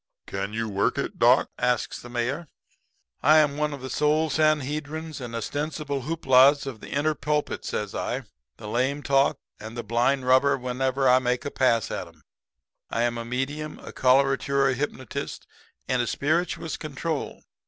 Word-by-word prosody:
"'Can 100 Hz, +1 st, -4 dB
you 115 Hz, +1 st, -2 dB
work 100 Hz, -1 st, 0 dB
it, -, -, -3 dB
doc?' -, -, +5 dB
asks 125 Hz, -1 st, 0 dB
the 120 Hz, -, -10 dB
Mayor. 125 Hz, +7 st, -2 dB, 0.7 s
"'I'm 150 Hz, -1 st, +5 dB
one 150 Hz, 0 st, 0 dB
of 140 Hz, -2 st, -7 dB
the 130 Hz, -, -6 dB
Sole 150 Hz, +1 st, +2 dB
Sanhedrims 155 Hz, +1 st, 0 dB
and 120 Hz, -2 st, -6 dB
Ostensible 145 Hz, +3 st, -3 dB
Hooplas 140 Hz, -3 st, +5 dB
of 130 Hz, -5 st, -6 dB
the -, -, -10 dB
Inner 150 Hz, +2 st, +1 dB
Pulpit,' 150 Hz, 0 st, -2 dB
says 105 Hz, -2 st, -3 dB
I. 130 Hz, +2 st, -2 dB, 0.3 s
'The 105 Hz, -, -9 dB
lame 130 Hz, +6 st, 0 dB
talk 135 Hz, 0 st, +3 dB, 0.2 s
and 110 Hz, +2 st, -8 dB
the 120 Hz, -, -3 dB
blind 120 Hz, +4 st, +1 dB
rubber 130 Hz, +2 st, +4 dB
whenever 130 Hz, +1 st, 0 dB
I 125 Hz, 0 st, +6 dB
make 125 Hz, -1 st, -1 dB
a 145 Hz, -, -3 dB
pass 115 Hz, -5 st, +2 dB
at -, -, -4 dB
'em. -, -, -20 dB, 0.7 s
I 115 Hz, -, 0 dB
am 120 Hz, -1 st, 0 dB
a -, -, -4 dB
medium, 140 Hz, +5 st, -3 dB
a -, -, -10 dB
coloratura 135 Hz, +1 st, +3 dB
hypnotist 130 Hz, -2 st, -4 dB, 0.4 s
and 125 Hz, -1 st, +1 dB
a 120 Hz, -, -2 dB
spirituous 160 Hz, +2 st, -1 dB
control. 155 Hz, +1 st, -4 dB
135 Hz, 165 wpm, -26 LUFS, 125-150 Hz, 0.7 s, I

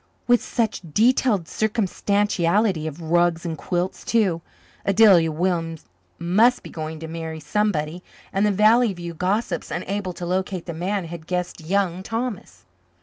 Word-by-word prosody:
With 245 Hz, -1 st, +4 dB
such 225 Hz, -3 st, -1 dB
detailed 225 Hz, -5 st, +3 dB
circumstantiality 205 Hz, -4 st, +1 dB
of 160 Hz, +2 st, -7 dB
rugs 175 Hz, 0 st, +2 dB
and 165 Hz, -2 st, -2 dB
quilts, 175 Hz, +4 st, -3 dB
too? 195 Hz, -8 st, +1 dB, 0.4 s
Adelia 195 Hz, -5 st, +5 dB
Williams 165 Hz, -1 st, -2 dB, 0.3 s
must 215 Hz, +9 st, +3 dB
be -, -, -10 dB
going 155 Hz, 0 st, -5 dB
to 160 Hz, -, -5 dB
marry 160 Hz, -1 st, -5 dB
somebody, 165 Hz, -1 st, -1 dB, 0.3 s
and 195 Hz, -, +1 dB
the 210 Hz, -, +3 dB
Valley 215 Hz, +3 st, +4 dB
View 170 Hz, -1 st, -7 dB
gossips, 185 Hz, +1 st, -1 dB
unable 185 Hz, +2 st, -3 dB
to 175 Hz, -, -6 dB
locate 185 Hz, 0 st, -2 dB
the 170 Hz, -, -5 dB
man, 185 Hz, +3 st, -2 dB
had 165 Hz, -1 st, -9 dB
guessed 180 Hz, -2 st, -3 dB
Young 185 Hz, +1 st, 0 dB
Thomas. 215 Hz, -, -5 dB
180 Hz, 145 wpm, -23 LUFS, 165-210 Hz, 0.4 s, Adelia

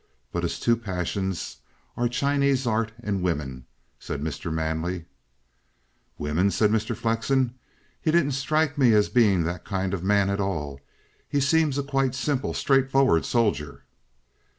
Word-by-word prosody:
But -, -, -2 dB
his -, -, -2 dB
two 115 Hz, 0 st, +2 dB
passions 95 Hz, -3 st, -3 dB, 0.4 s
are 120 Hz, -, +1 dB
Chinese 140 Hz, +1 st, +1 dB
art 115 Hz, -1 st, 0 dB
and 100 Hz, -3 st, -1 dB
women," 70 Hz, -8 st, -2 dB, 0.3 s
said -, -, -5 dB
Mr. 80 Hz, +3 st, -4 dB
Manley. 80 Hz, +2 st, -2 dB, 1.1 s
"Women?" 80 Hz, +7 st, +1 dB
said 105 Hz, +3 st, +2 dB
Mr. 110 Hz, +1 st, 0 dB
Flexen. 115 Hz, +3 st, +1 dB, 0.5 s
"He 160 Hz, -, 0 dB
didn't 155 Hz, -3 st, +3 dB
strike 145 Hz, +2 st, 0 dB
me 125 Hz, -4 st, +5 dB
as 105 Hz, -1 st, +4 dB
being 105 Hz, -8 st, +4 dB
that 85 Hz, +2 st, -3 dB
kind 95 Hz, -1 st, -2 dB
of 95 Hz, -3 st, -3 dB
man 100 Hz, 0 st, +3 dB
at 100 Hz, -, -1 dB
all. 75 Hz, -8 st, -3 dB, 0.5 s
He 145 Hz, -, +1 dB
seemed 145 Hz, 0 st, +2 dB
a 140 Hz, -, 0 dB
quite 135 Hz, -2 st, 0 dB
simple, 135 Hz, 0 st, -1 dB
straightforward 135 Hz, -, +3 dB
soldier." 105 Hz, -, 0 dB
110 Hz, 145 wpm, -25 LUFS, 90-135 Hz, 1.1 s, me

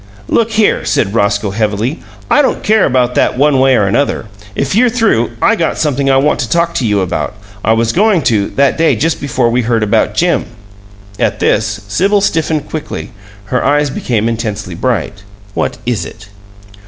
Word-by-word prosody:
"Look 230 Hz, -1 st, +1 dB
here," 220 Hz, -1 st, +2 dB
said 100 Hz, -2 st, 0 dB
Roscoe, 100 Hz, -2 st, 0 dB
heavily; 110 Hz, -, -1 dB, 0.3 s
"I -, -, +4 dB
don't 275 Hz, -, -1 dB
care 215 Hz, -1 st, +3 dB
about 125 Hz, -2 st, +1 dB
that -, -, +1 dB
one 140 Hz, 0 st, +3 dB
way 130 Hz, 0 st, +4 dB
or 105 Hz, -, +2 dB
another. 115 Hz, +5 st, 0 dB, 0.3 s
If 140 Hz, -, -1 dB
you're 240 Hz, +5 st, +4 dB
through, 220 Hz, -, +1 dB
I -, -, +4 dB
got 165 Hz, -, -1 dB
something 140 Hz, -2 st, 0 dB
I 135 Hz, -, +4 dB
want 145 Hz, +3 st, +1 dB
to -, -, -2 dB
talk 170 Hz, 0 st, +1 dB
to 125 Hz, -, 0 dB
you 105 Hz, -2 st, +1 dB
about. 95 Hz, +3 st, -3 dB, 0.3 s
I 110 Hz, -, +3 dB
was 115 Hz, 0 st, +1 dB
going 200 Hz, -, +2 dB
to, 105 Hz, -5 st, +1 dB
that 140 Hz, +2 st, +2 dB
day 165 Hz, -, +3 dB
just 165 Hz, +1 st, -1 dB
before 130 Hz, -4 st, 0 dB
we 125 Hz, +1 st, +1 dB
heard 115 Hz, -1 st, 0 dB
about 105 Hz, 0 st, +1 dB
Jim." 170 Hz, +3 st, +1 dB, 0.7 s
At -, -, 0 dB
this 105 Hz, -1 st, 0 dB
Sibyl 195 Hz, -, +2 dB
stiffened 160 Hz, -5 st, 0 dB
quickly; 155 Hz, -4 st, -6 dB, 0.4 s
her 125 Hz, -, +1 dB
eyes 145 Hz, 0 st, +2 dB
became 115 Hz, -4 st, -1 dB
intensely 105 Hz, -5 st, -3 dB
bright. 105 Hz, +1 st, -2 dB, 0.3 s
"What -, -, -2 dB
is 120 Hz, -3 st, -1 dB
it?" 105 Hz, -2 st, -11 dB
125 Hz, 185 wpm, -13 LUFS, 110-160 Hz, 0.7 s, I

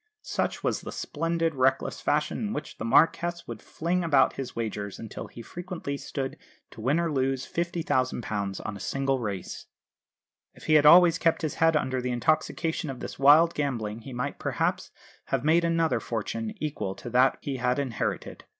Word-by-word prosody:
Such -, -, -2 dB
was -, -, 0 dB
the -, -, -7 dB
splendid, 165 Hz, +1 st, -1 dB
reckless 135 Hz, -1 st, +1 dB
fashion 150 Hz, +1 st, 0 dB
in 215 Hz, -1 st, -2 dB
which -, -, -6 dB
the -, -, -4 dB
Marquess 170 Hz, +7 st, +2 dB
would 115 Hz, -2 st, -7 dB
fling 175 Hz, +2 st, -2 dB
about 145 Hz, -5 st, +4 dB
his 135 Hz, -2 st, -6 dB
wagers 105 Hz, -3 st, -4 dB
until 115 Hz, -, -7 dB
he 115 Hz, -, -11 dB
frequently 175 Hz, -, -5 dB
stood 140 Hz, 0 st, -5 dB, 0.3 s
to 110 Hz, -, -11 dB
win 135 Hz, +8 st, +2 dB
or 170 Hz, -1 st, 0 dB
lose 135 Hz, -1 st, 0 dB
£50,000 130 Hz, -, -2 dB
on 105 Hz, -, -4 dB
a -, -, -9 dB
single 135 Hz, +5 st, -1 dB
race. 100 Hz, -5 st, -5 dB, 0.9 s
If -, -, -15 dB
he 155 Hz, -, +2 dB
had 150 Hz, -1 st, +6 dB
always 170 Hz, +1 st, +8 dB
kept 165 Hz, 0 st, +2 dB
his 155 Hz, -, -1 dB
head 165 Hz, -1 st, +5 dB
under 130 Hz, -3 st, -1 dB
the 125 Hz, -, -2 dB
intoxication 155 Hz, +4 st, 0 dB
of 130 Hz, -2 st, -6 dB
this -, -, -7 dB
wild 155 Hz, +5 st, +6 dB
gambling 115 Hz, -7 st, -2 dB
he 125 Hz, +4 st, -10 dB
might 125 Hz, +3 st, -4 dB
perhaps -, -, -1 dB, 0.4 s
have 130 Hz, -, -1 dB
made 165 Hz, +2 st, +4 dB
another 165 Hz, -1 st, +2 dB
fortune 215 Hz, -, -4 dB
equal 125 Hz, -, -3 dB
to -, -, -10 dB
that 130 Hz, +2 st, +4 dB
he 140 Hz, -2 st, -4 dB
had 125 Hz, +1 st, +1 dB
inherited. 135 Hz, -5 st, -3 dB
140 Hz, 180 wpm, -27 LUFS, 125-165 Hz, 0.9 s, always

